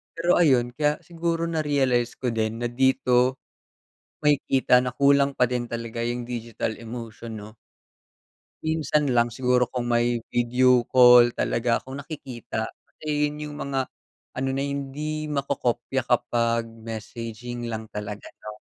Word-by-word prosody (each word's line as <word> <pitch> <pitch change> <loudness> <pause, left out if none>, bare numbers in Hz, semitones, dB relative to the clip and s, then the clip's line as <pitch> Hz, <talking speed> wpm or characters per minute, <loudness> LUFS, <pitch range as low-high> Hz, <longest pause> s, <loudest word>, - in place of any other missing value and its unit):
Pero 170 +1 +1
ayun, 125 -7 +4
kaya 150 0 +2
siguro 170 -1 -1
narealize 140 -7 +1
ko 130 - -1
din 110 0 0
na 120 - 0
dito, 130 -1 +3 1.1
makikita 140 -3 +3
na 125 - -1
kulang 140 0 +4
pa 125 - +5
din 125 -1 -1
talaga 115 0 -5
'yung 120 0 -2
digital 115 -1 -3
emotion 115 0 -7
'no. 105 - -9 1.2
Minsan 150 -3 +1
lang 120 0 +3
siguro 125 0 +1
kung 125 -1 -3
may 120 0 +2 0.2
video 125 +1 +4
call 125 -1 +8
talaga 120 0 +1
akong 135 +2 -8
nakikita, 135 -6 -5 0.2
kasi 150 -1 -1
'yun 150 - -8
'yung 150 -1 -6
mga 135 -1 -1 0.6
ano 135 +1 0
na 135 +1 -1
hindi 145 +2 -4
makokopya 135 -2 -1
kapag 115 -1 +1
messaging 115 +1 -7
lang 110 -1 -4
talaga 105 0 -6 0.2
'no. 105 0 -8
125 Hz, 135 wpm, -25 LUFS, 120-140 Hz, 1.2 s, call